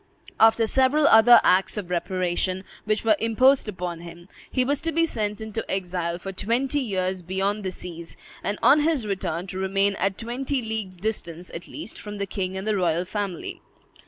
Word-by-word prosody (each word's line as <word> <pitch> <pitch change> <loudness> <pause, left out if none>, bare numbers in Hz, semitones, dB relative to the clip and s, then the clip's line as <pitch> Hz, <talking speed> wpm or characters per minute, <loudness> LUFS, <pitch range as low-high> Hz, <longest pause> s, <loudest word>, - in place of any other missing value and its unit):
After 225 +1 +5
several 265 +6 +3
other 235 -1 +8
acts 185 +3 +3
of 185 -4 -5
reparation 185 +1 -1 0.2
which 215 +1 0
were 220 -1 +5
imposed 245 +2 +3
upon 180 -3 -5
him, 170 +1 -11 0.2
he 255 -1 +1
was 285 +1 0
to 330 0 -1
be 330 +1 +2
sent 210 -8 -3
into 220 0 -4
exile 175 -2 -2
for 195 +2 -6
twenty 240 +9 0
years 190 -6 -2
beyond 195 +4 -1
the 190 - -1
seas, 170 -2 -9 0.3
and 205 - -2
on 295 - +7
his 300 -6 +1
return 190 -4 -2
to 190 0 -6
remain 195 +1 +1
at 195 0 0
twenty 260 +4 -2
leagues' 220 -4 -4
distance, 180 -4 -4
at 170 +1 -8
least, 300 -6 -8
from 210 0 -7
the 200 - -2
king 190 -1 -3
and 190 - -5
the 215 -1 +1
royal 175 -2 +1
family. 195 -2 -4
200 Hz, 185 wpm, -25 LUFS, 185-225 Hz, 0.3 s, other